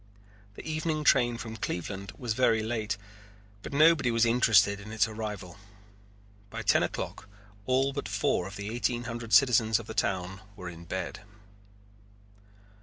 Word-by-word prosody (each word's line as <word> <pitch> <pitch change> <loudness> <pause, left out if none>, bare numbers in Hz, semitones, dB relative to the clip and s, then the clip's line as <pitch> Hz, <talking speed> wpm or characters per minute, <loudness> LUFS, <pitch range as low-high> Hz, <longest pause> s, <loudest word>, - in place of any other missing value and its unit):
The - - -9
evening 155 0 -1
train 120 -4 +4
from 115 0 -7
Cleveland 95 0 -4
was 120 -3 -2
very 115 -2 +2
late 110 -3 -2 0.6
but - - -8
nobody 155 -2 +5
was 115 0 +3
interested 110 -4 +4
in 105 +1 -10
its 110 +1 +2
arrival. 105 -5 -6 0.9
By - - -6
ten - - +4
o'clock 100 - -4 0.4
all 135 +2 +2
but 140 - -4
four 100 -2 0
of 100 - -9
the 105 +2 -5
eighteen 120 0 -1
hundred 115 -2 -6
citizens 115 -5 +5
of 115 - -7
the 110 - -7
town 95 -2 -1
were 90 -3 -7
in 85 0 -11
bed. 95 +2 -4
110 Hz, 150 wpm, -29 LUFS, 100-120 Hz, 0.9 s, nobody